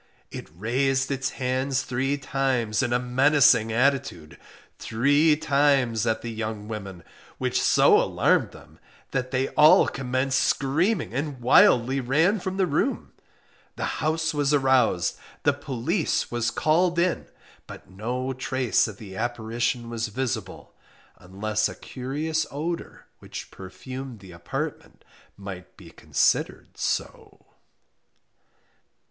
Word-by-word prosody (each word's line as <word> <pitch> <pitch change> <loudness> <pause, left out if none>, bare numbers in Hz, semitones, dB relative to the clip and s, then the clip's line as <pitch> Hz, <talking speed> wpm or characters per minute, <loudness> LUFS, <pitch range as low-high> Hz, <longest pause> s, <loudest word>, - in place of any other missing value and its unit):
It - - -8
raised 135 +7 0
its 135 -1 -1
hand 130 +1 -1
three 135 +2 -1
times 130 -5 -1
in 125 -2 -1
a 120 - +3
menacing 125 -2 +3
attitude, 125 - -1 0.4
three 145 +7 +3
times 140 -7 +2
at 110 0 -1
the 120 - -4
young 110 -2 -5
women, 100 -5 -7 0.3
which - - 0
so - - +5
alarmed - - +1
them, - - -17 0.3
that 125 0 -2
they 130 +1 -1
all 150 +1 +6
commenced 130 0 -1
screaming 160 - 0
and 140 0 -3
wildly 125 +1 +4
ran 160 - +2
from 190 +1 -4
the 190 - +3
room 175 - -1 0.6
the - - -3 0.2
house 160 +1 0
was 145 0 +1
aroused 130 - +2 0.2
the 145 - +3
police 145 - -2
was 120 -1 0
called 170 +6 +1
in 175 +1 0 0.4
but - - -11
no 125 +7 -3
trace 130 -1 0
of 105 -2 -9
the 100 -3 -10
apparition 115 +1 -2
was 115 -1 -3
visible, 120 0 -5 0.5
unless 105 +4 -2
a - - -8
curious 150 +5 -3
odour 165 +4 -5
which - - -9
perfumed 120 +7 -9
the 95 -2 -13
apartment 85 0 -6 0.3
might 95 -2 -9
be - - -14
considered - - -1
so. - - -4
130 Hz, 125 wpm, -25 LUFS, 115-145 Hz, 0.6 s, all